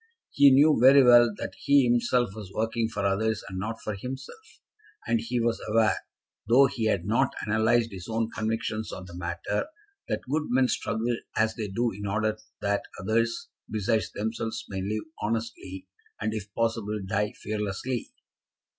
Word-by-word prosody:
He 140 0 +7
knew 145 +1 +5
very 135 +2 +8
well 120 -1 +7
that - - -5
he 140 -1 +4
himself 120 -1 +2
was 105 -3 -9
working 115 +2 -1
for 100 -3 -3
others, 110 +3 0
and 95 -1 -5
not 110 +4 -4
for 105 - -3
himself; 135 - -9 0.5
and 115 0 +1
he 120 +2 -2
was 115 0 0
aware, 110 0 +3 0.5
though 125 +5 +6
he 120 -4 -2
had 100 -5 +1
not 110 +3 +1
analysed 110 +2 +2
his 95 -3 -8
own 115 0 -1
convictions 110 -1 -2
on 95 - -7
the 85 -1 -11
matter, 85 - -3 0.4
that - - -2
good 150 +3 0
men 130 +1 +3
struggle 115 +2 -1 0.2
as 110 0 +2
they 110 -2 -4
do 115 +4 0
in 100 0 -6
order 110 +2 0 0.2
that 100 0 +1 0.2
others, 115 +4 0 0.2
besides 110 +1 0
themselves, 110 +1 -3
may 95 -2 -3
live 105 +3 -2 0.2
honestly, 105 -4 -4 0.3
and, 110 +1 -1
if 105 -2 -6
possible, 115 -2 -1
die 105 +2 -1
fearlessly. 105 +3 -4
110 Hz, 165 wpm, -27 LUFS, 105-120 Hz, 0.5 s, very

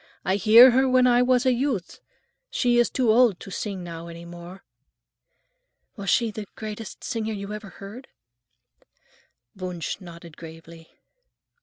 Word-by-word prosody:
I 190 +1 +1
hear 225 +6 +8
her 260 +2 +2
when 255 0 +4
I 245 -1 +4
was 250 0 +2
a 255 - +4
youth. 245 -7 -3 0.5
She 240 -1 +1
is 240 - +3
too 245 -4 +1
old 230 -5 +4
to 195 - -10
sing 195 -1 -5
now 170 -1 -8
any 170 0 -10
more." 175 +2 -11 1.3
"Was 200 -4 -5
she 230 +2 +2
the 210 -1 -7
greatest 215 0 -8
singer 220 -1 -3
you 200 0 -6
ever 210 -1 -8
heard?" 210 +8 -11 1.5
Wunsch 180 -2 -5
nodded 170 -2 -12
gravely. 165 0 -13
210 Hz, 145 wpm, -24 LUFS, 175-240 Hz, 1.5 s, hear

